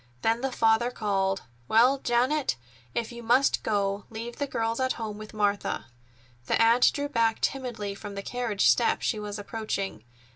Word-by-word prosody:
Then 225 +1 +2
the 270 0 -1
father 225 0 +3
called: 195 -4 -1 0.2
"Well, 250 +5 +5
Janet, 255 - +1 0.4
if 235 0 -2
you 235 0 -8
must 245 +4 +3
go, 200 -1 -1
leave 230 +2 -7
the 285 - -2
girls 230 -2 -1
at 260 0 +1
home 215 -2 -5
with 215 0 -9
Martha." 205 -2 -1 0.6
The - - +2
aunt 230 +2 +5
drew 285 0 -2
back 230 -5 +1
timidly 240 -7 -2
from 200 0 -8
the 200 - -5
carriage 240 -4 0
step 235 - +3
she 215 - 0
was 210 0 -5
approaching. 200 - -4
225 Hz, 170 wpm, -27 LUFS, 205-245 Hz, 0.6 s, Well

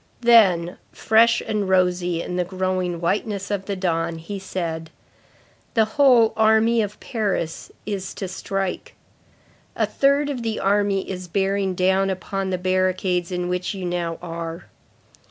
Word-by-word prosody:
Then, 195 -8 +4
fresh 230 +1 +3
and 205 -3 -2
rosy 180 -2 +1
in 180 - -5
the 180 - +1
growing 185 -1 -2
whiteness 200 +3 -1
of 195 -2 -2
the 200 - -3
dawn, 170 -3 -1
he 195 +5 -6
said: 165 -4 -4 0.9
"The 220 -1 +4
whole 240 -1 +4
army 220 +1 +4
of 210 0 -4
Paris 200 -8 -3
is 195 -2 -4
to 195 - -4
strike. 190 0 -4 0.8
A - - +2
third 280 +1 +2
of 255 -4 -4
the 225 -1 -2
army 200 -1 +1
is 185 -1 -6
bearing 195 +1 0
down 190 +2 +2
upon 190 +1 -3
the 185 - -1
barricades 185 -1 0
in 180 0 -2
which 180 +2 -2
you 190 -2 -5
now 175 -1 -2
are. 165 0 -6
190 Hz, 145 wpm, -22 LUFS, 180-210 Hz, 0.9 s, Then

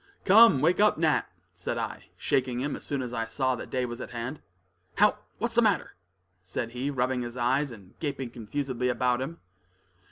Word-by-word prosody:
"Come, 210 - +7
wake 170 +5 +3
up, 210 0 +5
Nat!" 160 -1 +2 0.3
said - - -4
I, - - -4
shaking 125 -2 0
him 140 +3 -2
as - - -9
soon 140 -2 -2
as 120 -1 -6
I 115 -1 -1
saw 130 +2 0
that 125 - -6
day 125 -1 0
was 120 +1 -6
at - - -6
hand. 120 +5 -5 0.6
"How? - - +4 0.2
what's - - -1
the - - +5
matter?" - - +1 0.5
said 105 +5 -4
he, 125 +3 -2
rubbing 130 -2 0
his 120 +1 -6
eyes, 130 +4 +1
and 100 -5 -13
gaping 140 -5 -3
confusedly 125 +2 -3
about 125 0 +1
him. 160 +6 -5
130 Hz, 190 wpm, -28 LUFS, 120-145 Hz, 0.6 s, Come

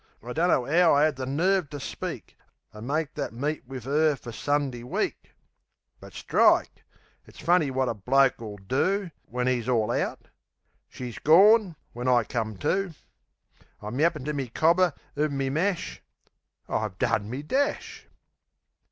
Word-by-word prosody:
I 125 +1 -6
dunno'ow 165 +1 +3
I 145 +2 +5
'ad 155 -2 0
the 130 0 -5
nerve 175 +4 +1
ter 145 - -6
speak, 135 - -6 0.4
An' 105 +2 -9
make 150 +1 -1
that 140 -5 -4
meet 145 +2 -3
wiv 130 -3 -8
'er 150 +2 +2
fer 120 -2 -10
Sundee 140 -1 -1
week! 125 - -4 0.6
But - - -13
strike! - - +2 0.4
It's - - -17
funny 165 -2 +2
wot 130 0 0
a - - 0
bloke'll 115 -1 +1
do 185 - 0 0.2
When 125 +1 -2
'e's 125 -1 0
all 115 -4 +1
out...She's 125 -3 -7
gorn, 195 +3 +5 0.2
when 125 +2 -4
I 125 -2 +4
come 110 -3 -3
to. 190 -3 0 0.8
I'm 110 +6 -5
yappin' 155 -4 +1
to 150 - -2
me 135 -3 -3
cobber 170 +5 +3 0.2
uv 150 +1 +1
me 135 -1 -2
mash.... 165 - -2 0.7
I've - - -2
done 100 - 0
me 130 +5 -5
dash! 270 - -2
140 Hz, 145 wpm, -26 LUFS, 125-160 Hz, 0.8 s, I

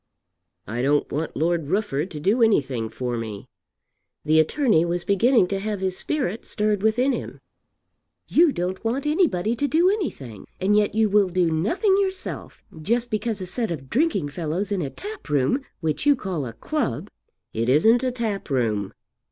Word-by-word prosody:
"I 115 +3 -3
don't 145 +3 +1
want 155 +3 -3
Lord 165 -2 0
Rufford 185 -4 -1
to 155 - -7
do 205 +10 +1
anything 135 - +2
for 120 +2 -3
me." 110 -3 -6 0.8
The 155 +1 +4
attorney 210 - +3
was 175 0 -2
beginning 215 +3 +3
to 195 - -1
have 210 0 -3
his 190 -1 -1
spirit 235 -4 -2
stirred 210 -2 -1
within 235 +6 +2
him. - - -5 0.9
"You 335 -1 +4
don't 185 -1 -3
want 245 +5 -1
anybody 295 - +1
to 285 +4 0
do 335 +7 +3
anything, 140 - -5
and 195 +3 +2
yet 210 0 +2
you 220 0 +3
will 205 -2 +3
do 180 -2 +1
nothing 350 - +2
yourself, 380 -1 -4 0.2
just 235 +8 0
because 215 -1 -2
a - - -3
set 225 +5 -2
of 135 -6 -6
drinking 225 - +1
fellows 170 +7 -3
in 195 -3 0
a 145 - -2
tap 415 - -9
room, 145 - +1 0.2
which 160 - -1
you 290 - +6
call 175 - -4
a 115 - -7
club 300 - -3 0.2
" - - -57
"It 115 +2 -1
isn't 220 - +4
a 255 - +1
tap 225 -7 -3
room." 110 -7 0
195 Hz, 175 wpm, -24 LUFS, 150-240 Hz, 0.9 s, you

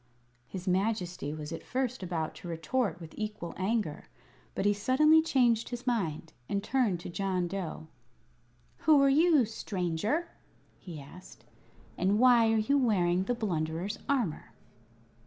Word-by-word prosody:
His 185 +4 -7
Majesty 185 -5 -1
was 150 0 -6
at 165 - -5
first 255 -2 -2
about 170 -4 -3
to - - -9
retort 170 +3 -1
with 165 -2 -10
equal 210 -5 -5
anger; 190 -5 -2 0.5
but - - -1
he 205 - +4
suddenly 305 +10 +4
changed 240 -7 +2
his 245 0 -6
mind 165 - -2 0.2
and 200 0 -1
turned 240 -9 +1
to - - -7
John 185 0 -1
Dough. 175 -4 -5 0.9
"Who 310 -2 +5
are 275 - +5
you, 305 -2 +5
stranger?" 210 - -2 0.5
he 170 -5 -9
asked. 145 +6 -13 0.5
"And 195 +3 +2
why 235 -2 +5
are 225 - +3
you 280 +7 +2
wearing 185 -7 +2
the 245 - 0
Blunderer's 175 -2 -2
armor?" 240 - -1
200 Hz, 140 wpm, -30 LUFS, 175-245 Hz, 0.9 s, Who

